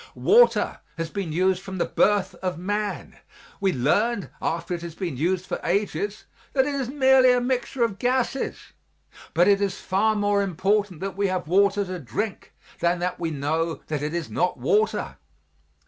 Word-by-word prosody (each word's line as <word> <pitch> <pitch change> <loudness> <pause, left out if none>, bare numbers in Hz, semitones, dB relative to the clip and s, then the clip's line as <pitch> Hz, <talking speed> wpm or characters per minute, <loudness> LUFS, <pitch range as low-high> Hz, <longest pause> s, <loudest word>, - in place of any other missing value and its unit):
Water 480 +3 +4 0.2
has 165 -1 -4
been 195 -5 -3
used 185 +3 +1
from 190 -1 -7
the 175 - +1
birth 200 -3 +2
of 185 -3 -2
man; 205 +3 -3 0.4
we 195 -1 +2
learned 195 - +1
after 165 +2 -2
it 170 - -4
had 170 -1 -8
been 175 -7 -3
used 175 +6 0
for - - -4
ages 205 +2 -1 0.3
that 265 -2 +3
it 290 - -2
is 270 -3 -2
merely 265 -2 +5
a 250 - +3
mixture 250 0 -1
of 205 -4 -1
gases, 255 +1 -1 0.6
but 175 +3 +5
it 200 0 +4
is 195 -2 -1
far 215 +3 +1
more 205 -1 +2
important 195 -1 0
that 195 0 -4
we 200 0 +1
have 185 -3 -2
water 200 +3 +3
to 185 -1 -5
drink 165 - -4 0.3
than 170 +1 +2
that 180 +1 -3
we 165 -2 -1
know 160 +3 -1
that 150 -2 -2
it 150 +3 -3
is 170 -3 -2
not 180 - -1
water. 210 - 0
195 Hz, 180 wpm, -24 LUFS, 170-210 Hz, 0.6 s, merely